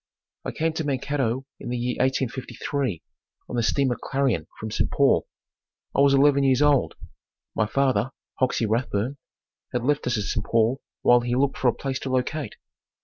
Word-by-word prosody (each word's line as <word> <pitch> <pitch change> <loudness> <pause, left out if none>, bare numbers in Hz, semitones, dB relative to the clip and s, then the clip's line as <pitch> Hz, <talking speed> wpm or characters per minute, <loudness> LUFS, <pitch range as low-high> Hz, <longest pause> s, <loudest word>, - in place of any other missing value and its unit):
I - - -2
came 160 0 -1
to 160 - -2
Mankato 135 -2 -1
in - - -6
the 125 - -1
year 125 +1 -1
1853 130 - -1 0.4
on - - -5
the 120 - +2
Steamer 130 +1 +1
Clarion 130 - 0
from 110 0 -5
St. - - 0
Paul. - - +3 0.7
I - - +2
was 140 0 +5
eleven 140 0 +5
years 135 +1 +4
old. 145 -3 +3 0.6
My 105 - +1
father, 130 -2 +1 0.3
Hoxey 125 -3 +1
Rathbun, 115 +3 -1 0.6
had 120 -1 -1
left 145 +1 +1
us 120 -2 +1
at 105 - -1
St. 105 +1 -2
Paul 115 +5 +1 0.2
while 120 0 +6
he 120 0 -1
looked 135 +1 +1
for 130 - +2
a 120 - +4
place 135 -2 -3
to 135 - -5
locate. 130 0 -1
130 Hz, 175 wpm, -25 LUFS, 120-140 Hz, 0.7 s, while